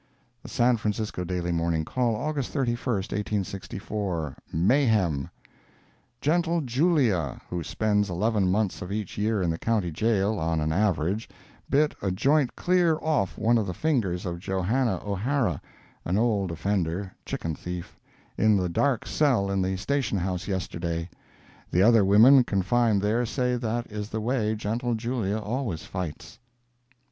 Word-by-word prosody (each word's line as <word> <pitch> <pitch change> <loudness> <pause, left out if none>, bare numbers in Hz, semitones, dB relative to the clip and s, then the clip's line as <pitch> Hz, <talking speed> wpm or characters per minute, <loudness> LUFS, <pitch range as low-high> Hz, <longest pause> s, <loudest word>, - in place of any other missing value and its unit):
The - - -10
San 120 -1 +3
Francisco 105 -3 -2
Daily 90 -1 -2
Morning 85 -1 0
Call, 120 +1 0
August 145 +2 -2
31, 120 -5 0 0.7
1864 95 -5 -4 0.2
MAYHEM 95 - +2 0.9
"Gentle 170 +2 +1
Julia," 125 - +1
who 90 -1 -2
spends 105 +2 0
eleven 100 +2 +1
months 100 0 0
of 90 - -6
each 105 -2 -4
year 105 -2 +1
in 85 - +1
the 80 - -4
County 105 -7 0
Jail, 105 +3 +1
on 80 0 0
an 80 0 0
average, 95 +1 0 0.4
bit 150 +2 +3
a 100 - 0
joint 135 +8 +2
clear 175 -3 +2
off 150 -11 0
one 115 +1 +3
of 105 - -2
the 90 - -4
fingers 110 - 0
of 85 -1 -4
Joanna 95 +4 0
O'Hara, 115 +6 0 0.4
(an 90 +3 0
old 105 -5 +1
offender—chicken 85 -1 -3
thief,) 90 +2 -7 0.4
in 110 -1 +4
the 90 -2 0
"dark 125 +8 +1
cell" 125 -10 +2
in 100 -1 +1
the 95 0 -1
station 125 0 -1
house 90 -1 -2
yesterday. 85 -3 -3 0.6
The 90 - +3
other 115 -1 +6
women 115 +7 +7
confined 105 +1 +1
there 110 +4 +2
say 125 +1 0
that 120 0 -2
is 105 0 -5
the 110 - -3
way 110 -1 0
Gentle 115 +3 -1
Julia 110 -3 -1
always 110 -5 -3
fights. 90 -5 -6
105 Hz, 145 wpm, -26 LUFS, 90-120 Hz, 0.9 s, women